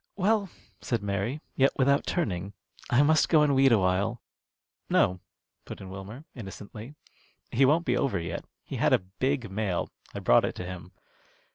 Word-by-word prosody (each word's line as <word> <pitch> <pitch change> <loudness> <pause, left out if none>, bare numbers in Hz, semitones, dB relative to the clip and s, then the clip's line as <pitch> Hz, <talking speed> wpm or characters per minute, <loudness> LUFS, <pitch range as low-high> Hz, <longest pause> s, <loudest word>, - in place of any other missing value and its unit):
"Well," 200 0 +1 0.3
said 115 -4 -2
Mary, 100 +8 -2
yet 135 +1 +3
without 140 +1 +3
turning, 100 - -2 0.4
"I 130 +4 +5
must 155 +1 +4
go 155 -3 +5
and 145 -2 +3
weed 135 -1 +5
a 115 - +6
while." 100 +5 +1 0.7
"No," 90 0 +3 0.4
put - - -9
in 95 -1 -9
Wilmer, 100 +9 -9
innocently; 110 +3 -9 0.6
"he 135 +4 +4
won't 160 +5 +3
be - - +2
over 135 - 0
yet. 85 - -4 0.2
He - - -6
had - - +3
a 90 - +2
big 130 -5 0
mail. 95 -3 -2 0.2
I - - -3
brought - - +4
it - - -2
to 90 - -6
him." 90 -1 -8
115 Hz, 170 wpm, -28 LUFS, 95-140 Hz, 0.7 s, a